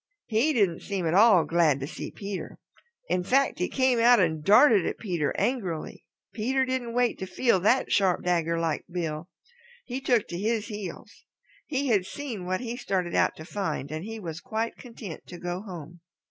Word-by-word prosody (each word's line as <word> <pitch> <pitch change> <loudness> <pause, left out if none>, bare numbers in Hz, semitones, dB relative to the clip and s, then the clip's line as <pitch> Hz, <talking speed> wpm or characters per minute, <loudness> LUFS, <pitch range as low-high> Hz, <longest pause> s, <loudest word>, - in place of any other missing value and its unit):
He 230 +8 +2
didn't 200 - +2
seem 195 -4 -3
at 160 - +1
all 200 -3 +6
glad 165 -5 +3
to 135 - -3
see - - -6
Peter. 200 -2 -6 0.5
In 180 - +1
fact, 270 +3 +2
he 180 - +1
came 260 -3 +2
out 240 0 +6
and 160 -4 +1
darted 215 - +6
at - - -3
Peter 175 -9 -1
angrily. 190 -11 -2 0.3
Peter 260 +4 +1
didn't 255 -2 -3
wait 245 -1 +1
to 190 - -4
feel 190 +2 +2
that 225 +8 +2
sharp 190 -3 +2
dagger 170 -2 +1
like 165 -2 -1
bill. 165 -1 -4 0.6
He 255 +2 -4
took 245 -5 +2
to 175 - -4
his 220 +2 -1
heels. 205 -3 -8 0.4
He 280 -2 -1
had 200 -5 +2
seen 235 -11 -6
what 185 +3 -1
he 240 -1 -4
started 190 -8 -2
out - - +2
to 155 - -10
find 180 -7 -3
and 155 +1 -4
he 225 +2 -6
was 165 -3 -6
quite 225 +1 -3
content 225 - -9
to 175 - -9
go 175 +1 -4
home. 175 -4 -9
200 Hz, 190 wpm, -27 LUFS, 175-235 Hz, 0.6 s, all